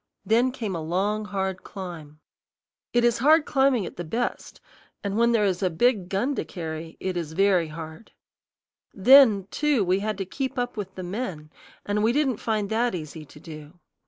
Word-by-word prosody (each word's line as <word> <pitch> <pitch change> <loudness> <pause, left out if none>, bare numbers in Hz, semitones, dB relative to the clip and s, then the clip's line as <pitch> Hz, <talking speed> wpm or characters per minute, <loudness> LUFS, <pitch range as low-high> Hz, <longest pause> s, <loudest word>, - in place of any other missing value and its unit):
Then 240 +4 +3
came 220 -7 -4
a 165 - -4
long, 200 +6 -1
hard 190 -1 -3
climb. 160 -6 -9 0.7
It 240 0 +2
is 240 -1 +2
hard 300 +4 +5
climbing 265 -7 +2
at - - -9
the 175 - -4
best, 235 +9 -4 0.4
and 200 -1 -2
when 235 +1 +3
there 220 -3 +3
is 185 -1 0
a 185 - +2
big 195 +1 +1
gun 235 +9 0
to - - -2
carry, 160 -2 -7
it 185 -1 -3
is 165 -3 -4
very 185 -2 +3
hard. 160 +5 -9 0.8
Then 220 -2 +6
too, 295 -9 +1
we 185 +2 +2
had 215 0 -3
to 195 - -3
keep 265 +7 -4
up 245 0 -2
with 195 -3 -6
the 185 - -6
men, 175 -6 -5 0.3
and 205 +1 0
we 225 +2 +2
didn't 270 -5 +1
find 215 -2 -2
that 235 -1 +1
easy 155 -1 -7
to 150 - -16
do. 155 +1 -11
200 Hz, 190 wpm, -25 LUFS, 175-235 Hz, 0.8 s, Then